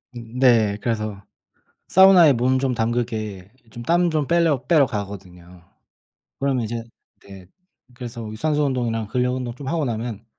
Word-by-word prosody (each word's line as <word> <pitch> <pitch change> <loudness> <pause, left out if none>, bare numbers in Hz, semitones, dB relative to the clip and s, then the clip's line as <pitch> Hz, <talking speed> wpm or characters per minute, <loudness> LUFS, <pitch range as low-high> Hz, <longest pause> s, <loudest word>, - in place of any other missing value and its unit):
음 120 +1 -8
네. 115 -6 +4
그래서 110 -4 -3 0.7
사우나에 190 -5 +7
몸 130 +1 +1
좀 130 -1 -1
담그게 110 -4 -3 0.2
좀 120 +2 -9
땀 175 +5 +2
좀 155 -3 -1
뺄러 165 -6 +2
빼러 150 -3 +4
가거든요. 90 -5 -8 0.8
그러면 135 -3 0
이제 115 +1 -5 0.4
네 95 -2 -12 0.5
그래서 120 -2 -8
유산소 150 +6 0
운동이랑 120 -5 -2
근력 125 +2 -1
운동 125 -2 -4
좀 140 0 -9
하고 160 +1 -1
나면 115 -2 -5
120 Hz, 290 characters per minute, -22 LUFS, 110-135 Hz, 0.8 s, 사우나에